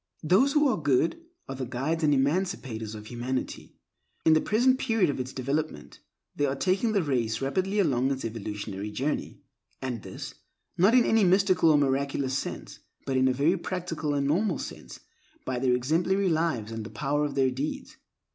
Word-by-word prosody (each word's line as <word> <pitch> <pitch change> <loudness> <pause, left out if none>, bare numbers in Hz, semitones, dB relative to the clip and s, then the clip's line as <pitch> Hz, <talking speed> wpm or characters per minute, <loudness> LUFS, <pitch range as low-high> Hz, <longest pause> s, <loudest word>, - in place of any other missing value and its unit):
Those 210 - +4
who 295 -1 +4
are 255 - 0
good 145 - +1 0.3
are 135 - -5
the 130 -2 -5
guides 140 +7 -2
and 150 - +4
emancipators 135 - -1
of 105 0 -9
humanity. 120 +3 -4 0.5
In 160 - +6
the 155 - +4
present 255 +4 +2
period 225 - +2
of 135 - -6
its 130 +1 -4
development, 140 - -3 0.4
they 145 - +1
are 135 - -1
taking 190 - +1
the 200 -4 +2
race 120 -6 0
rapidly 185 +9 -1
along 135 -10 +2
in 140 - +1
its 130 - -5
evolutionary 105 -2 -5
journey; 135 +8 -3 0.4
and 125 -4 -4
this, - - -8 0.4
not 195 +7 +4
in 250 - +5
any 225 -1 +3
mystical 185 -2 +4
or 150 - +5
miraculous 140 -1 0
sense, 135 - -5 0.3
but 135 - -1
in 130 0 +3
a - - +3
very 150 +8 +2
practical 170 -5 -3
and 140 -1 0
normal 180 +10 +1
sense, - - -8 0.4
by 125 - -2
their 125 -1 +2
exemplary 175 +9 +1
lives, 160 -10 0
by 115 - -5
the 110 +1 -6
power 145 +1 -1
of 145 -1 -2
their 135 -2 +2
deeds. 135 +4 -5
145 Hz, 185 wpm, -27 LUFS, 130-180 Hz, 0.5 s, In